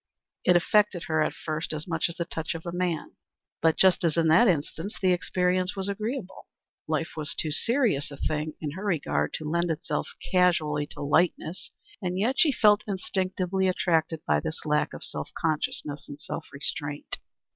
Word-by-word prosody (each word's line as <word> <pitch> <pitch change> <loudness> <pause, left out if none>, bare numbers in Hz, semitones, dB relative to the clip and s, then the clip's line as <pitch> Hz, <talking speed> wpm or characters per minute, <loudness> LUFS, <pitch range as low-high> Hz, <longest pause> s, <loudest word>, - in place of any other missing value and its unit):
It 180 - +5
affected 195 +1 +3
her 155 -1 +1
at - - 0
first 155 0 -3 0.2
much 165 -1 0
as 170 - -6
the 170 - -2
touch 165 -1 -4
of 165 - -6
man; 175 -3 -2 0.4
but 160 0 +3
just 190 -2 +5
as 165 -1 +2
in 165 -1 +4
that 175 +10 +6
instance 165 +3 -1
the 185 -1 +4
experience 180 +1 0
was 195 0 -2
agreeable. 215 0 -4 0.4
Life 160 +1 0
was 155 -2 -4
too 155 - -1
serious 230 - +1
a 140 - -9
thing 155 +1 -2
in 150 -2 -3
her 190 +7 -7
regard 140 - 0
to 155 - -4
lend 170 +2 +1
itself 165 +2 -2 0.2
casually 155 -5 +3
to - - -9
lightness, 170 +3 +1 0.3
and 180 -1 -2
yet 235 +7 +1
she 315 - +7
felt 210 -4 +4
instinctively 190 -1 -1
attracted 165 -3 +1
by 75 0 +3
this 160 - -5
lack 150 0 +1
of - - -8
self - - -5
consciousness 150 -2 -2
and 145 0 -8
self - - -6
restraint. 145 +1 -3
170 Hz, 175 wpm, -27 LUFS, 155-185 Hz, 0.4 s, she